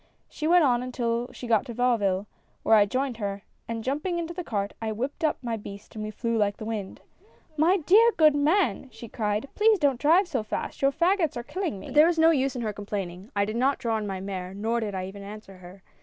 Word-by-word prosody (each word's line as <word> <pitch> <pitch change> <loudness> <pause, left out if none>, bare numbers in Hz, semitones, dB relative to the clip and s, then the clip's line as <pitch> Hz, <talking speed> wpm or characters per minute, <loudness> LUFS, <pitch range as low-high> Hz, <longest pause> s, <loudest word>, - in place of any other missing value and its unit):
She 310 - -4
went 350 0 +5
on 245 -4 +3
until 245 -1 -2
she - - -9
got 225 -3 +2
to 235 - -7
Vauville, 210 -6 +1 0.4
where - - +3
I 205 -2 +6
joined 255 +1 -2
her, 200 -2 -4 0.2
and 230 -1 -4
jumping 300 +8 -2
into 340 0 -4
the 360 +1 -5
cart 205 -7 -3
I 220 -1 -2
whipped 260 +9 -4
up 310 - +2
my 230 -2 -2
beast 200 -1 -10
and 215 - -5
we 215 - -4
flew 230 +2 -2
like 205 -1 +1
the 215 - -7
wind. 215 -4 -5 0.3
" 315 - -32
'My 330 +6 +4
dear 410 +8 +5
good 310 -2 +6
man! 290 - +1
' - - -31
she 235 - -10
cried, 210 +2 -2
'please 430 0 +4
don't 280 -7 +1
drive 340 +6 +4
so 270 -9 -1
fast, 215 - -5
your 275 0 +4
fagots 335 -1 +1
are 240 - -4
killing 345 - -4
me.' - - -10
" - - -8
But - - -7
there 300 +2 +7
was 340 -1 +1
no 325 +1 +6
use 270 -3 0
in 245 - -3
her 215 -1 -2
complaining; 195 -1 -6
I 200 0 +2
did 215 +2 -4
not 270 +3 +2
draw 225 -2 -1
in 210 - -4
my 190 -1 -4
mare 190 -1 -5
nor 225 +3 -1
did 210 -3 -3
I 185 0 -3
even 195 +2 -9
answer 200 -1 -10
her. 185 +2 -14
235 Hz, 255 wpm, -26 LUFS, 205-300 Hz, 0.4 s, there